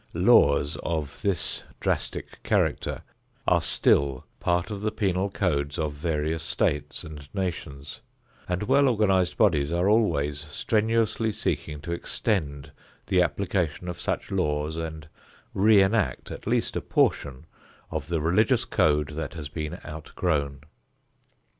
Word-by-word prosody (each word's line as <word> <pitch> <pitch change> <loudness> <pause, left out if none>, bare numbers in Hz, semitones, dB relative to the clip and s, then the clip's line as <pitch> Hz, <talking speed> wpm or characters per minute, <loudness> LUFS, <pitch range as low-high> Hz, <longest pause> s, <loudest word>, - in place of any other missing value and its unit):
Laws 70 +1 +4
of 75 -4 -3
this 100 -3 -1 0.2
drastic - - -3
character - - 0 0.4
are - - +4
still 70 -2 +2
part 90 +3 0
of 100 -1 -4
the 110 - +1
penal 100 -2 0
codes 75 -7 -1
of 75 -3 -1
various 80 +1 -1
states 75 -2 -1
and 75 -2 -10
nations, 75 -7 -4 0.5
and 90 +2 -1
well 140 +5 +4
organized 95 -7 +2
bodies 80 -9 +3
are 85 +2 +1
always 75 -10 +2
strenuously 110 +5 +1
seeking 75 -7 -3
to 85 - -6
extend 80 -5 -2 0.3
the 90 -2 +3
application 90 -3 -1
of 90 - -5
such - - -2
laws 75 +1 0
and 80 -2 -5 0.5
re 100 0 +6
enact 105 0 0
at - - -8
least - - 0
a - - -1
portion 70 +2 0 0.5
of 80 -3 -3
the 85 -2 -1
religious 90 +8 +3
code 75 -1 +2
that 80 0 -5
has 75 -4 -6
been 75 0 -5
outgrown. 75 -2 -2
80 Hz, 130 wpm, -26 LUFS, 75-95 Hz, 0.5 s, re